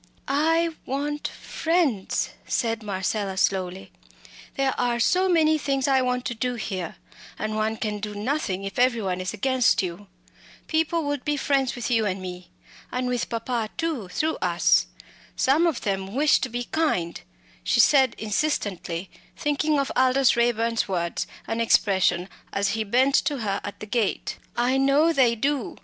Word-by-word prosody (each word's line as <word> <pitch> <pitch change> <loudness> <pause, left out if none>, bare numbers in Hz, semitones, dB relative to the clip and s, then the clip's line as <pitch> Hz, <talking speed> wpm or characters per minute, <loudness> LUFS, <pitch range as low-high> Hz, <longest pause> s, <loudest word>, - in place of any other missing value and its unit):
"I 325 +4 +2 0.2
want 295 +2 -2
friends!" 320 - -1 0.2
said 230 -1 0
Marcella, 195 -1 -2
slowly. 190 -1 -1 0.6
"There 270 -1 +1
are 240 -1 +1
so 370 +10 +3
many 315 -3 +4
things 275 -2 0
I 265 -1 +4
want 250 0 -1
to - - -2
do 245 +2 -2
here, 190 -7 -4 0.4
and 215 0 -3
one 215 +1 0
can 210 -1 -3
do 210 0 -5
nothing 205 -4 -2
if 195 +3 -5
every 245 -3 +3
one 185 -1 -2
is 185 0 -3
against 255 0 +2
you. 185 +3 -6 0.6
People 325 +1 0
would 285 -2 -2
be 295 0 0
friends 275 -2 +1
with 245 0 -3
you 225 -3 +2
and 190 0 -2
me 180 -1 -8 0.4
and 250 0 -2
with 250 -1 -1
papa 230 -1 -2
too, 315 - -2
through 315 +11 -1
us. 175 - +3 0.5
Some 305 +6 +3
of 315 -8 -1
them 195 +1 -3
wish 295 +2 +4
to 260 - -2
be 240 +1 -3
kind" 240 - -1 0.4
she - - +1 0.2
added 265 -4 +4
insistently, 200 - -2 0.3
thinking 295 +1 +1
of 275 - -1
Aldous 260 0 +4
Raeburn's 230 -1 +1
words 170 -3 -2 0.2
and 225 +1 -2
expression 190 -5 +3 0.2
as 200 +1 0
he 220 +1 -1
bent 255 +6 +2
to 290 -6 -1
her 200 -2 -1
at 200 0 -7
the - - -6
gate 215 -2 -1 0.2
"I 245 +2 +2
know 280 +5 +4
they 250 -5 +4
do. 275 +1 -1
240 Hz, 165 wpm, -25 LUFS, 200-275 Hz, 0.6 s, many